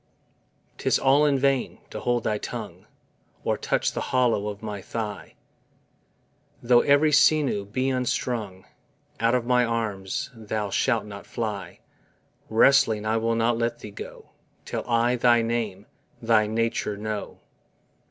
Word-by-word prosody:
'Tis - - +2
all 140 +3 +4
in 140 -2 +2
vain 135 -1 0
to - - -5
hold 120 -1 0
thy 105 -1 -1
tongue, - - -7 0.6
Or - - +1
touch - - 0
the - - -4
hollow 120 -5 +1
of 105 0 -6
my 105 -2 -5
thigh: 105 -1 -6 1.2
Though 120 0 +4
every 145 +2 +4
sinew 145 -8 +3
be 130 +6 -1
unstrung, 120 -6 -2 0.5
Out 115 +2 +2
of 125 -2 0
my 125 0 +3
arms 115 +1 -3
Thou 110 -2 -4
shalt 115 -1 +1
not 100 -1 -10
fly; 110 -4 -5 0.7
Wrestling 110 -2 +4
I 110 +1 +1
will 115 +1 0
not 115 +1 +1
let 120 0 -1
Thee 105 -3 -10
go, 100 - -10 0.3
Till - - -4
I 120 +1 +2
thy 120 -1 +4
name, 110 -4 -2 0.3
thy 110 -2 +3
nature 110 -1 -1
know. 105 0 -5
115 Hz, 140 wpm, -25 LUFS, 105-125 Hz, 1.2 s, all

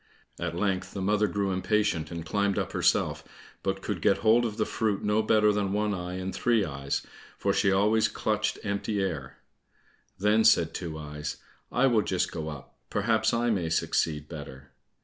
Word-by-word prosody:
At 85 -1 -3
length 95 +1 -1
the 95 - -3
mother 105 +2 +2
grew 100 +1 -1
impatient, 95 -3 0
and 85 -1 -6
climbed 100 +2 0
up - - -1
herself, - - +1 0.4
but 95 0 -2
could 100 -5 -3
get 100 +2 +3
hold 115 +2 +5
of 105 -1 -7
the 110 - +1
fruit 105 -3 -1
no 105 +1 +2
better 105 -1 +4
than 100 -2 -1
One 105 0 0
eye 90 -1 -4
and 95 +1 -4
Three 115 -4 +2
eyes, 70 -2 -3 0.3
for - - +1
she 100 - +3
always 105 +3 +3
clutched 110 0 -1
empty 100 +1 -2
air. 80 -9 -3 0.8
Then 105 +3 +3
said 80 -5 +4
Two 80 -3 -5
eyes, 75 0 -6 0.3
"I 125 - +3
will 120 -5 +4
just 95 -3 -1
go 80 -1 -4
up, 75 -4 -10
perhaps 110 +1 +1
I 120 0 +1
may 90 -6 0
succeed 75 -2 0
better." 70 -4 -9
100 Hz, 180 wpm, -28 LUFS, 85-105 Hz, 0.8 s, hold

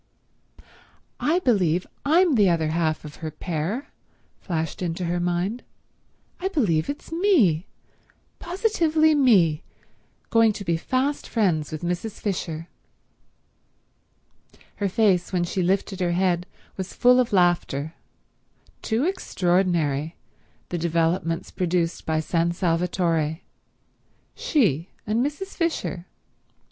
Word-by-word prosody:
"I 320 +4 +2
believe 185 - +2 0.2
I'm 330 +3 +4
the 205 -6 +4
other 165 -2 +1
half 160 -1 -1
of 150 - -10
her 160 - -5
pair," 175 - -4 0.5
flashed 160 -3 -3
into 175 0 -2
her 175 +1 -1
mind. 175 +7 -1 0.8
"I 370 - -1
believe 200 - +1
it's 285 - -6
me, 310 - +3 0.7
positively 335 -5 +2
me, 195 - +4 0.7
going 225 -1 +5
to 200 -1 -7
be 170 - +1
fast 260 - -1
friends 175 -10 +1
with 155 +1 -6
Mrs. 180 +5 -3
Fisher!" 165 -5 -3 2.1
Her 200 -1 0
face 190 -4 +2
when 180 -2 +1
she 185 +2 -2
lifted 190 +2 0
her 175 -1 +1
head 180 -1 +1 0.3
was 190 -1 -5
full 250 +1 +5
of 250 - +1
laughter. 175 -5 +1 0.9
Too 225 +3 0
extraordinary, 175 - 0 0.5
the 175 - -2
developments 165 +1 0
produced 175 -2 -1
by 160 -1 +1
San 170 +1 0
Salvatore. 170 -2 0 0.9
She 185 - +1 0.2
and 220 +3 +1
Mrs. 295 +8 -4
Fisher.. 315 - -2
180 Hz, 110 wpm, -24 LUFS, 165-230 Hz, 2.1 s, going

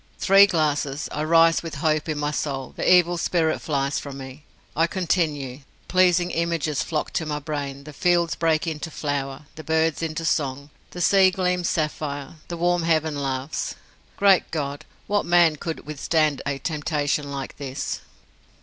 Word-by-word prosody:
Three 195 +1 +6
glasses 150 -4 0
I 150 - -2
rise 165 +1 +5
with 165 -2 -6
hope 155 +2 0
in 155 - -1
my 145 0 -1
soul, 135 -3 -3
the - - +1
evil 175 -1 +5
spirit 165 -2 +1
flies 140 -2 -1
from 140 -2 -8
me. 135 +2 -10 0.3
I 165 +2 +3
continue 155 -8 -1 0.3
pleasing 180 -1 +3
images 165 -3 -1
flock 155 -3 -3
to 160 - -1
my 150 -1 -2
brain, 140 -2 -5
the 150 +1 -10
fields 175 +2 +2
break 160 -1 +1
into 160 0 -4
flower, 145 -2 -3
the 155 - -10
birds 160 +1 +1
into 165 0 -3
song, 140 -2 -1 0.2
the 175 - -7
sea 190 +1 +5
gleams 180 -2 0
sapphire, 150 -1 -3
the 170 - -5
warm 175 +1 +2
heaven 160 -2 +1
laughs. 135 +1 -3 0.4
Great 195 -2 +4
God! 145 -1 -4 0.2
what 205 0 +1
man 170 -3 +4
could 165 +2 -5
withstand 155 0 0
a 140 -1 -1
temptation 150 -1 -1
like 140 -1 -6
this? 140 -1 -4
155 Hz, 160 wpm, -24 LUFS, 145-170 Hz, 0.4 s, Three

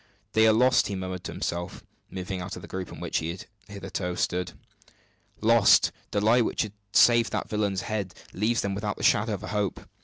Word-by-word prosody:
"They 110 +1 +4
are - - +7
lost," 125 +4 +4
he 100 - -3
murmured 95 -1 -5
to - - -4
himself, 85 +1 -4 0.3
moving 95 0 -5
out 90 +1 -6
of - - -10
the - - -9
group 95 -1 -6
in - - -9
which - - -1
he 80 - -4
had 90 +2 -6 0.2
hitherto 95 -3 -4
stood. 90 0 -1 0.9
"Lost! 115 -1 +5 0.2
The 100 - 0
lie 115 +4 +4
which 115 - 0
has 110 - -6 0.2
saved 120 0 +5
that - - -2
villain's 100 -3 -1
head 105 -4 -4 0.2
leaves 110 +5 +1
them 100 -1 -2
without 105 0 -3
the - - -7
shadow 105 +1 +3
of 100 - -10
a 110 - -6
hope. 105 -3 -1
100 Hz, 210 wpm, -27 LUFS, 95-110 Hz, 0.9 s, are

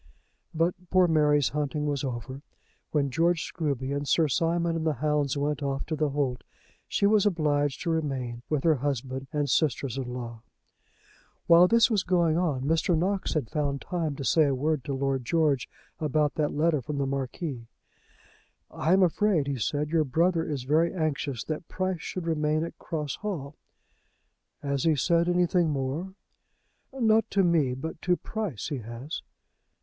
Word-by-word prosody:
But 165 +2 +1 0.2
poor 185 -1 +4
Mary's 150 -3 +3
hunting 150 0 -2
was 145 -1 -1
over. 130 +1 -5 0.5
When 140 -3 0
George 165 +3 +2
Scruby 140 -5 -2
and 145 0 -3
Sir 160 +2 +3
Simon 165 +3 +1
and 165 - -2
the 155 -2 +1
hounds 145 0 0
went 145 +1 -1
off 140 -1 -2
to 155 - -2
the 150 0 0
holt, 135 -3 -1 0.4
she - - +1
was 210 0 +4
obliged 145 -6 0
to 170 - 0
remain 135 -7 -2
with 150 -3 0
her 160 -3 +4
husband 135 0 -3
and 145 -1 0
sisters 135 -3 0
in 125 -2 -4
law. 120 -2 -6 1.0
While 170 +1 +7
this 230 +3 +4
was 210 -3 +3
going 175 -4 +2
on 155 -7 0
Mr. 165 +3 +2
Knox 190 +2 -1
had 135 -8 -1
found 140 -2 -1
time 165 -4 -3
to 140 - -6
say 155 +3 +4
a 140 -2 +1
word 150 +1 0
to 140 - -2
Lord 135 -1 -1
George 150 -1 +1 0.3
about 150 -1 +1
that 150 -2 0
letter 155 -1 +1
from 145 +3 -5
the 140 - 0
Marquis. 135 -1 -4 1.0
"I 165 - +1
am 190 0 +5
afraid," 185 -3 +2
he 140 -2 -3
said, 145 +7 -1
"your 165 -2 +3
brother 165 +5 +1
is 145 -5 -3
very 155 +5 +2
anxious 145 - -2
that 155 +1 -5
Price 185 -2 -2
should 180 -2 -5
remain 155 -1 +1
at 170 - -7
Cross 150 -4 -4
Hall." 155 -9 -5 1.1
"Has 140 -2 -1
he 160 -2 +3
said 170 +5 +2
anything 175 -1 +2
more?" 150 +7 -3 0.8
"Not 225 -4 +2
to 195 -1 +2
me; 155 -8 +2
but 160 +4 -6
to 180 -1 +2
Price 210 - -4
he 145 -4 -3
has." 120 +6 -6
150 Hz, 170 wpm, -27 LUFS, 140-170 Hz, 1.1 s, While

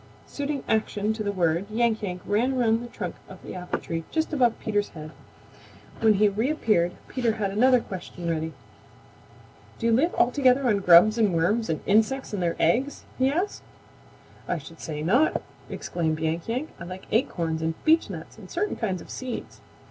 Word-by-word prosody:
Suiting 285 -1 -4
action 215 -1 0
to 220 - -6
the 205 -1 -1
word, 175 0 0
Yank 225 0 +1
Yank 180 -3 -4
ran 235 +6 +1
around 230 -3 +2
the 240 - -6
trunk 185 -7 -5 0.2
of 190 - -10
the - - -7
apple 180 -1 -3
tree 165 -1 -4
just 320 0 -1
above 245 -5 +3
Peter's 205 -1 -1
head. 155 -1 -9 0.9
When 220 -1 +4
he 210 +2 +4
reappeared 215 - +1
Peter 240 -4 0
had 205 -3 -2
another 250 +5 +5
question 180 -4 -7
ready. 160 -1 -2 1.2
"Do 230 - -4
you 230 - +4
live 285 +10 +2
altogether 255 +1 +3
on 210 -5 +3
grubs 195 +5 +6
and 205 -6 +3
worms 210 +7 +1
and 160 - -1
insects 220 +5 +2
and 200 - -2
their 170 -1 0
eggs?" 275 +4 +1 0.2
he 260 +1 +4
asked. 355 +8 -2 0.9
"I 180 - 0
should 165 +2 -11
say 150 -1 -5
not!" 245 - +3 0.3
exclaimed 160 -2 -2
Yank 160 +1 -2
Yank. 255 +7 -2
"I 170 - -7
like 185 +1 -8
acorns 170 - 0
and 160 0 -1
beechnuts 220 - +1
and 190 -4 -12
certain 410 +4 -2
kinds 190 -6 -2
of - - -13
seeds." 255 -2 -6
215 Hz, 180 wpm, -26 LUFS, 175-250 Hz, 1.2 s, grubs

